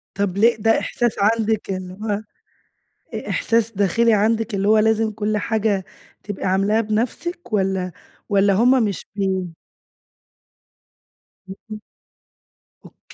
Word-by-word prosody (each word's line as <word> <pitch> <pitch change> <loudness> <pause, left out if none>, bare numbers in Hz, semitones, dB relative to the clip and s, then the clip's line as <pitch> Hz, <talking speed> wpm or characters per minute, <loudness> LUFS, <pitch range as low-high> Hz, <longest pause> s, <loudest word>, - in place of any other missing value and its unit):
طب 200 -2 -1
ليه، 230 +3 +5
ده 225 +1 +2
إحساس 240 -2 -1
عندِك 220 +1 +1
اللي 185 -1 -4
هو 210 -2 -1 1.0
إ - - -5
إحساس 230 -1 +1
داخلي 225 +3 +2
عندِك 220 +2 +1
اللي 200 +1 0
هو 215 +1 +5
لازم 220 0 +2
كل 210 0 -2
حاجة 210 -2 0 0.4
تبقي 205 -1 -5
عاملاها 195 +4 +2
بنفسِك، 235 +10 -3
والَّا 190 -3 0 0.4
والَّا 200 -1 +3
هم 245 +4 +4
مش 200 -4 -3
بي 190 -4 -2 1.9
اهم. 215 +3 -9 1.0
أوك - - -17
210 Hz, 120 wpm, -21 LUFS, 195-225 Hz, 1.9 s, ليه